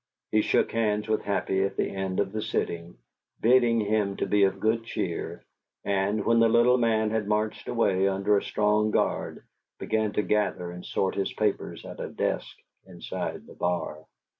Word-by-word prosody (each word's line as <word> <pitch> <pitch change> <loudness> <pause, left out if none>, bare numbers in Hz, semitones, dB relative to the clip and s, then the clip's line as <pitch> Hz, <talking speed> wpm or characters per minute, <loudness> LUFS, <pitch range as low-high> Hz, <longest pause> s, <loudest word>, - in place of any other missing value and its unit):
He 110 - +4
shook - - +1
hands 105 -2 0
with 110 0 +1
Happy 95 -1 0
at 100 - -2
the - - +1
end 95 -1 -3
of 100 -1 0
the 110 +1 -3
sitting, 85 - -3 0.4
bidding 120 -1 +4
him 105 -1 0
be 100 0 +3
of 95 0 -1
good 110 +2 +1
cheer, 115 - -4 0.4
and, 100 +1 0
when 115 0 +4
the 115 0 +5
little 120 +2 +4
man 110 -2 +2
had 110 -2 -1
marched 105 0 -1
away, 100 -5 +2
under 100 +2 +2
a 100 - +2
strong 105 0 +1
guard, - - -1 0.3
began 110 -1 0
to 105 - +1
gather 100 -5 0
and 90 0 -9
sort 95 -1 -1
his 100 -1 -1
papers 105 -2 -2
at - - -9
a - - -4
desk - - -2 0.3
inside - - -5
the - - -13
bar. 85 -3 -2
105 Hz, 175 wpm, -27 LUFS, 95-110 Hz, 0.4 s, the